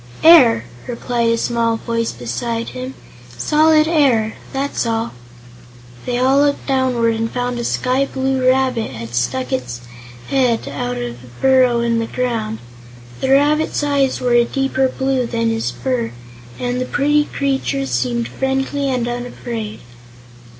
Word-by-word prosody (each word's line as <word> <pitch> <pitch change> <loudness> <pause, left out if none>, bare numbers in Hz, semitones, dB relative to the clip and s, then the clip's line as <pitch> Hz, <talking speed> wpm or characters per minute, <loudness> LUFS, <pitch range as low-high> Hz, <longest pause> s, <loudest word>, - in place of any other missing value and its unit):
"Air," 260 - +7 0.2
replied 235 -1 -1
a 230 - +2
small 230 -1 0
voice 230 0 -2
beside 125 - -4
him. 255 +1 -7 0.4
"Solid 310 - +4
air; 260 -9 +2 0.2
that's 275 +1 -1
all." 225 0 -1 1.0
They 245 -1 0
all 260 +2 +3
looked 285 0 +1
downward 255 -4 +1
and 225 0 -2
found 245 0 -2
a - - -3
sky 255 +3 0
blue 265 -1 -1
rabbit 255 -3 +1
had 115 +1 -8
stuck 125 +1 -1
his 125 -2 -3 0.5
head 250 -4 +1
out 125 -3 -3
of 120 0 -6
a - - -13
burrow 255 -3 +4
in 235 -1 +1
the 230 - -2
ground. 225 -4 -2 0.6
The 265 - -1
rabbit's 295 +3 +3
eyes 280 -2 +1
were 250 -1 +1
a 240 0 +6
deeper 265 +1 0
blue 265 -2 -1
than 230 -1 0
his 225 - -1
fur, 120 -1 -2 0.4
and 250 0 -2
the - - -1
pretty 295 +2 +2
creature 270 - -1
seemed 120 -2 -1
friendly 270 - -1
and 250 -2 -1
unafraid. 240 -3 -5
240 Hz, 145 wpm, -18 LUFS, 220-265 Hz, 1.0 s, Air